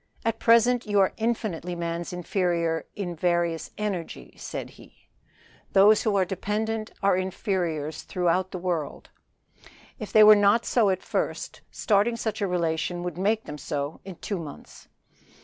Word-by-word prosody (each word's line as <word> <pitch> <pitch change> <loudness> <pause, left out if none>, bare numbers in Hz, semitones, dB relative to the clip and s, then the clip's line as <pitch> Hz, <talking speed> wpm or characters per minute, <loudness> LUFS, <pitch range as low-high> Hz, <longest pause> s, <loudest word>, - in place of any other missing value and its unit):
"At 225 - 0
present 235 +1 +4
you 205 -1 +2
are 190 - +3
infinitely 215 -7 -2
man's 170 0 -3
inferior 175 -2 -1
in 180 -4 -4
various 170 -1 0
energy," 175 - -4
said - - -6
he. - - -20 0.6
"Dependents 210 +1 +2
are 200 -1 +4
inferiors 175 -5 -2
throughout 180 +1 0
the 185 - -5
world." 175 -4 -3 0.9
If 215 - -6
they 215 - +7
were 215 0 +10
not 205 +3 +3
so 225 -5 +3
at 185 -1 -1
first - - -3
starting 215 +2 +1
such 220 -2 -3
a 200 - +1
relation 175 0 -1
would 175 0 -5
make 215 +3 +1
them 150 0 -8
so 145 +2 -4
in 190 -2 -8
two 200 +2 -4
months. 150 -4 -10
185 Hz, 140 wpm, -26 LUFS, 170-210 Hz, 0.9 s, were